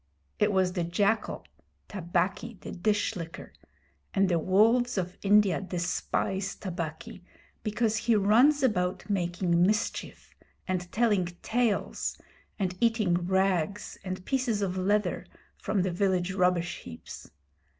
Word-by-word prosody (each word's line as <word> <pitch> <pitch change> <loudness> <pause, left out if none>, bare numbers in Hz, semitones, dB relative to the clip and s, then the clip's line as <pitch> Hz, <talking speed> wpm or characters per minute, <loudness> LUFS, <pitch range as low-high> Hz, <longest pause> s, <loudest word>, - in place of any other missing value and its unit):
It 210 0 +3
was 185 -2 +2
the 175 -2 -1
jackal 200 +5 0 0.4
Tabaqui, 195 +4 -2
the - - -7
Dish 210 +4 0
licker 165 -2 -8 0.6
and 195 -1 +3
the 170 -2 +2
wolves 225 +7 +3
of 180 -1 -2
India 200 -3 +4
despise 190 +1 -2
Tabaqui 170 -1 -6 0.4
because 220 +1 0
he 230 +2 +2
runs 240 +9 +4
about 180 -7 0
making 175 -2 +1
mischief, 210 +4 -1 0.3
and 180 -2 -2
telling 210 -6 +2 0.2
tales, 235 -3 0 0.4
and 185 -3 -1
eating 225 -6 +2
rags 190 0 0
and 185 -1 -5
pieces 245 -6 0
of 185 -2 -1
leather 205 +3 0 0.3
from 195 -3 -1
the 185 - 0
village 185 0 0
rubbish 180 -2 +1
heaps. 80 -2 -10
190 Hz, 120 wpm, -28 LUFS, 180-210 Hz, 0.6 s, India